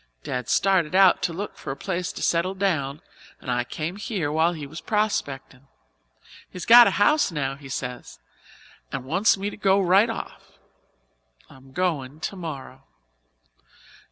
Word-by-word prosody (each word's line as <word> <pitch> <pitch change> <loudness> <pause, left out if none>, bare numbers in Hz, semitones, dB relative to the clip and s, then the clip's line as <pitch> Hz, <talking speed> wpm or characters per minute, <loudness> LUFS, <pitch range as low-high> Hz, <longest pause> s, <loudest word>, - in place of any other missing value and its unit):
Dad 125 0 -4
started 185 -3 +2
out 190 -1 +5
to - - 0
look 195 +5 -6
for - - -8
a 135 - -4
place 180 -2 -3
to - - -6
settle 175 +3 +1
down 155 -8 -1 0.4
and 125 - -5
I 120 0 0
came 160 +8 -5
here 195 -8 -3
while 160 +3 +2
he 155 -3 -7
was 155 +4 -9
prospectin'. 145 - -2 0.8
He's 180 - -8
got 240 +1 +9
a - - 0
house 290 +4 +3
now, 135 -4 -2
he 140 -1 -12
says, 125 -2 -6 0.7
and 135 -2 -5
wants 190 +10 +2
me 200 +2 -3
to - - -10
go 195 -1 +3
right 195 +4 +4
off. - - -8 0.9
I'm 135 0 -17
goin' 150 -4 -2
tomorrow." 160 -6 -7
170 Hz, 155 wpm, -24 LUFS, 140-195 Hz, 0.9 s, got